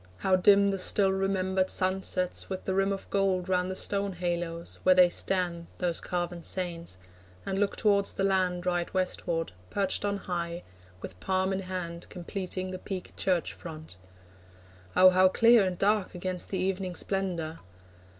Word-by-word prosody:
How 185 - +2
dim 200 +2 +5
The 195 - -2
still 195 +1 +5
remembered 190 -1 0
sunsets, 185 -1 0
with 190 -1 -5
the 190 - -1
rim 195 +1 +1
Of 195 - -5
gold 195 -2 +1
round 180 -1 +1
the 185 - -3
stone 200 0 -1
haloes, 175 -1 -2
where 185 0 +5
they 180 -1 +7
stand, 175 -2 -1
Those 175 -2 -1
carven 175 -1 -3
saints, 170 - -4 0.5
and 195 0 -2
look 205 -1 +1
towards 200 -2 +2
the 195 - -2
land, 185 -2 +1
Right 175 -1 -1
Westward, 170 - -1 0.2
perched 200 0 -1
on 200 0 0
high, 175 -2 -4 0.4
with 90 - -9
palm 190 - 0
in 190 - -1
hand, 180 -3 -6
Completing 185 +1 -5
the 185 - -6
peaked 185 -2 -7
church 180 -3 0
front. 155 - -10 1.0
Oh 185 0 +8
how 185 +1 +5
clear 230 +2 +5
And 180 -1 -3
dark 205 -1 +1
against 180 0 -1
the 190 - -2
evening 185 0 -2
splendour! 175 -6 -2
185 Hz, 160 wpm, -28 LUFS, 175-195 Hz, 1.0 s, Oh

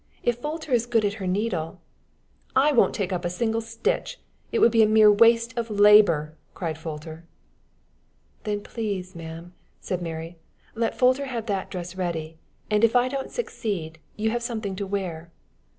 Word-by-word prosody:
If 240 0 0
Folter 310 +1 -5
is 240 -1 +2
good 230 -3 +2
at 200 - 0
her 185 - -2
needle 180 -3 -2 0.4
" - - -38
"I 280 +3 +5
won't 260 - +3
take 195 -3 -2
up 180 0 -2
a 175 - -1
single 225 +5 -1
stitch. 230 - -2 0.3
It - - 0
would 235 - +5
be 225 -1 +5
mere 215 -1 +7
waste 230 +3 +4
of 235 -1 -3
labor," 205 -7 +5 0.2
cried 165 -3 -3
Folter. 160 0 -8 1.2
"Then, 205 -1 -2
please, 200 -5 -4
ma'am," 165 +1 -9 0.3
said 185 -2 -3
Mary, 165 0 -6 0.3
"let 230 0 -1
Folter 255 +2 +3
have 235 -4 -4
that 200 -4 -2
dress 180 -1 -6
ready, 165 -3 -4 0.3
and, 210 +1 +1
if 230 +1 +4
I 245 +1 +4
don't 270 0 -4
succeed, 200 - -4 0.2
you 220 +1 0
have 240 +1 -1
something 220 -5 -3
to 200 - -3
wear." 175 -4 -4
205 Hz, 170 wpm, -25 LUFS, 175-230 Hz, 1.2 s, mere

